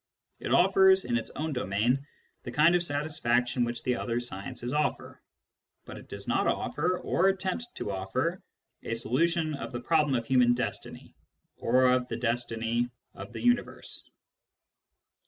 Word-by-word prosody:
It - - -4
offers, 190 +1 +5
in 120 - -1
its 120 - -2
own 155 0 -2
domain, 125 +4 0 0.3
the - - -7
kind 155 +3 +5
of 175 - +3
satisfaction 135 -6 0
which 120 0 -3
the 125 - +1
other 120 0 -1
sciences 120 +2 -4
offer. 150 0 -2 0.6
But - - -9
it - - -15
does - - -7
not - - +1
offer, 180 0 0
or 180 +1 +1
attempt 190 +4 -1
to 100 - -4
offer, 125 - -2 0.4
a 115 - -3
solution 155 +7 +1
of 140 - -5
the 120 - -4
problem 150 +1 +2
of 115 -1 -1
human 125 -1 +4
destiny, 125 - -5 0.4
or 130 +2 +2
of 125 0 +3
the 115 - -4
destiny 120 0 -1 0.2
of - - -9
the - - -7
universe. 245 0 -1
125 Hz, 155 wpm, -29 LUFS, 120-165 Hz, 0.6 s, offers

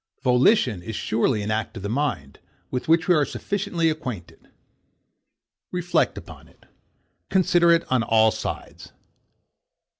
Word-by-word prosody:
Volition 125 - +3
is 110 +5 -7
surely 110 0 0
an 105 - -3
act 110 0 -3
of 95 - -8
the - - -2
mind, 105 - -3 0.3
with 125 - -3
which 165 +1 +3
we 180 - +5
are 150 -3 +3
sufficiently 190 0 -2
acquainted. 125 - -5 1.2
Reflect 180 -1 0
upon - - -11
it. - - -25 0.6
Consider 175 -2 +3
it 170 0 +3
on 130 -2 +3
all 110 0 +3
sides. - - -7
130 Hz, 130 wpm, -23 LUFS, 110-170 Hz, 1.2 s, we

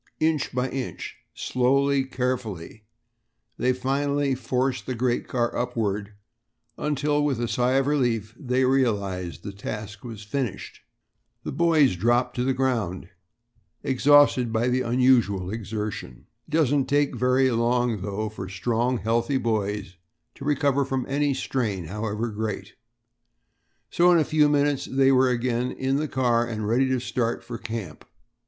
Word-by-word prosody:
Inch 155 -2 +1
by 125 +1 -1
inch, 130 -2 -5 0.2
slowly, 135 +2 +1
carefully, 120 -6 -4 0.7
they 125 - +3
finally 140 +2 0
forced 130 +1 -1
the 130 - -2
great 120 0 0
car 120 -2 -1
upward, 105 -4 -2 0.6
until 150 0 0
with 140 -5 0
a 120 - -1
sigh 125 +2 +1
of 135 0 +3
relief 120 -7 0
they 130 0 0
realized 100 - 0
that - - -5
the 100 - -17
task 105 -1 -6
was 115 -3 -8
finished. 120 +1 -4 0.6
The - - -4
boys 160 - +3
dropped 120 +7 +1
to 125 - +1
the 135 - +1
ground, 115 -10 -1 0.7
exhausted 135 -2 +4
by 115 +2 +1
the 130 +1 +1
unusual 120 -7 +2
exertion. 105 - -5 0.2
It - - -18
doesn't 145 -3 +2
take 145 0 +1
very 130 +1 +3
long, 120 -2 +1
though, 105 +2 -3
for 95 -3 -7
strong, 120 +5 0
healthy 115 +6 0
boys 105 -5 -2 0.4
to - - -11
recover 140 -1 +2
from 135 -1 -2
any 140 0 +1
strain, 110 -9 -2
however 105 +5 -3
great; 105 -2 -4 1.2
so 175 +1 +5
in 175 - +6
a 160 - +4
few 150 -1 +3
minutes 145 -1 +1
they 135 0 +4
were 130 0 +4
again 125 0 0
in 135 +1 -1
the 155 +1 -1
car 120 -4 +2
and 110 -3 -3
ready 130 +4 +2
to 130 -1 +1
start 120 -1 -2
for 120 -1 -7
camp. 110 -9 -6
125 Hz, 145 wpm, -25 LUFS, 110-135 Hz, 1.2 s, in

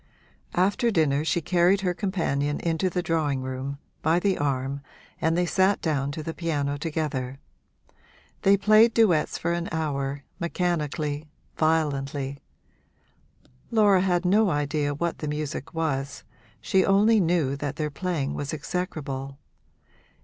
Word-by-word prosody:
After 205 +7 +2
dinner 155 -7 +2
she 170 +2 0
carried 180 +4 +3
her 180 -2 0
companion 165 -7 -1
into 170 +2 0
the 180 0 -2
drawing 150 -5 0
room, 130 +2 -4 0.2
by 160 +2 +3
the 190 +1 +2
arm, 140 -1 -1 0.4
and 165 +1 +2
they 180 - +2
sat 190 +3 +2
down 140 -4 -1
to 155 - -5
the 165 - -4
piano 145 -5 -1
together. 145 -4 -3 1.0
They 200 +1 +5
played 215 +3 +5
duets 185 -10 +3
for 170 +1 -1
an 170 0 -2
hour, 140 -3 -2 0.2
mechanically, 155 -4 -2 0.3
violently; 140 -3 0 1.3
Laura 205 -4 +4
had 180 -1 +1
no 205 +3 +4
idea 145 -1 0
what 170 +3 -2
the 155 - -4
music 150 -2 -4
was 140 -4 -2 0.4
she 190 - +2
only 210 +3 +4
knew 165 -6 +1
that 145 0 -4
their 150 -1 -2
playing 160 -3 -2
was 145 +2 -3
execrable. 140 -5 -4
160 Hz, 135 wpm, -26 LUFS, 140-180 Hz, 1.3 s, They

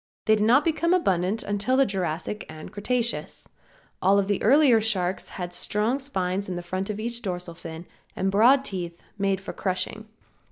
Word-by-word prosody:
They 220 - +5
did 210 - 0
not 255 +7 +5
become 335 +2 +2
abundant 195 - +1
until 205 +6 0
the 275 - +5
Jurassic 185 0 -3
and 155 +3 -9
Cretaceous. 235 +3 -2 0.5
All 195 +2 +4
of 200 -1 +1
the 205 -1 0
earlier 255 -1 +5
sharks 190 -4 0
had 175 -1 -5
strong 215 +8 0
spines 195 -8 -2
in 180 -1 -3
front 185 +3 -3
of 210 0 -3
each 235 +2 -3
dorsal 180 -5 -4
fin 165 0 -9 0.3
and 190 0 0
broad 250 +7 +5
teeth 175 -5 -5 0.2
made 195 -1 +1
for 195 - -7
crushing. 190 +3 -2
200 Hz, 170 wpm, -25 LUFS, 185-235 Hz, 0.5 s, They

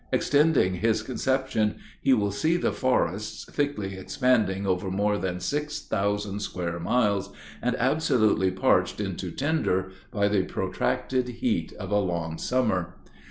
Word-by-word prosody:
Extending 145 - +3
his 110 +2 +1
conception, 130 -3 0 0.3
he - - +3
will 105 -5 +3
see 160 +11 +1
the - - 0
forests 105 -5 0
thickly 140 -10 -2
expanding 100 -2 +1
over 95 0 0
more 100 +2 +1
than 90 -1 -2
six 150 +11 -2
thousand 100 0 -1
square 85 -4 -3
miles, 100 0 +1 0.3
and 125 - 0
absolutely 125 -8 +2
parched 95 - +2
into - - -3
tinder 130 - 0 0.2
by 100 -4 +1
the 100 -2 +2
protracted 125 +6 -1
heat 115 -9 -1
of 100 -2 -7
a 105 - +3
long 85 -4 -2
summer. 95 -9 0
105 Hz, 135 wpm, -26 LUFS, 95-130 Hz, 0.3 s, Extending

